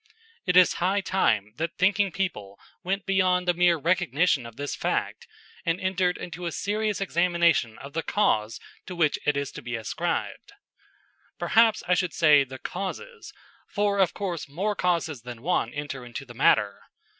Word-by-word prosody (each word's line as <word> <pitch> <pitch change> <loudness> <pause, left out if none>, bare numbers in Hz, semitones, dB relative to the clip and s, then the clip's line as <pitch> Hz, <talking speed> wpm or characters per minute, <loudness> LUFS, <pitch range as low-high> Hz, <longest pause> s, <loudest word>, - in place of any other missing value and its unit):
It 180 0 +4
is 185 - +6
high 195 +3 +2
time 110 - +1
that 165 +1 -3
thinking 195 +1 +2
people 105 - -4 0.2
went 195 0 -2
beyond 185 -2 +2
the 175 - +4
mere 175 -1 +3
recognition 160 -5 +1
of 115 - -13
this 145 +2 -4
fact - - -2 0.4
and 165 +2 0
entered 185 -1 0
into 175 0 -6
a - - -3
serious 210 +3 -1
examination 170 - +1
of 140 +1 -10
the 165 - -1
cause 115 - 0 0.3
to 180 - -6
which 160 -4 +1
it 150 -1 +2
is 140 0 -3
to - - -9
be 120 0 -5
ascribed. 115 - -3 0.8
Perhaps 225 -1 +3
I 180 - +3
should 180 -2 0
say 150 -4 +6
the 130 0 -9
causes, 445 - -6 0.4
for 205 -1 0
of 190 -3 +2
course 175 -8 -4
more 195 +8 -2
causes 170 -8 -1
than 120 0 -9
one 155 -8 0
enter 145 -2 -6
into 120 +2 -8
the 120 - -12
matter. 105 -3 +2
175 Hz, 170 wpm, -26 LUFS, 140-190 Hz, 0.8 s, is